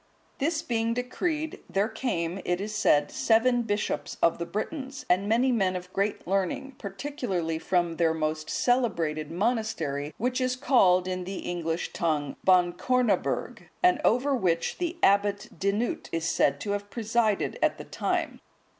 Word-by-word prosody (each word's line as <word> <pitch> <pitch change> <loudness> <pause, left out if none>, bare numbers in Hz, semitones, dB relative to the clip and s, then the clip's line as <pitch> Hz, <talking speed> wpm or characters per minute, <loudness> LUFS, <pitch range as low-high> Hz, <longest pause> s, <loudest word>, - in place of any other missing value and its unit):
This 310 +3 0
being 230 -1 0
decreed, 305 +5 -2
there 195 +2 +1
came, 195 -7 -2
it 175 0 0
is 210 +2 -4
said, 150 -9 +3
seven 240 +2 +3
bishops 210 -2 -2
of 170 - +3
the 170 - -3
Britons,(166) 265 - -5
and 195 +3 +2
many 245 +4 +3
men 190 -6 +1
of 180 0 -7
great 200 +1 -1
learning, 195 +9 -1
particularly 195 - -3
from 175 -1 0
their 165 -2 +3
most 155 0 -2
celebrated 165 - 0
monastery, 175 - -1
which 250 +3 -1
is 255 0 +1
called, 185 -9 +4
in 185 0 -2
the 190 +1 -5
English 170 -1 -2
tongue, 150 -4 -1
Bancornaburg,(167) 190 +6 +1
and 360 0 +4
over 260 +5 +3
which 175 -8 0
the 345 -1 -2
Abbot 200 0 +3
Dinoot(168) 205 +4 -1
is 165 0 -2
said 140 -3 +2
to 205 - -2
have 205 0 -3
presided 220 -1 0
at - - +2
that - - -11
time. - - -2
200 Hz, 150 wpm, -27 LUFS, 175-245 Hz, -, called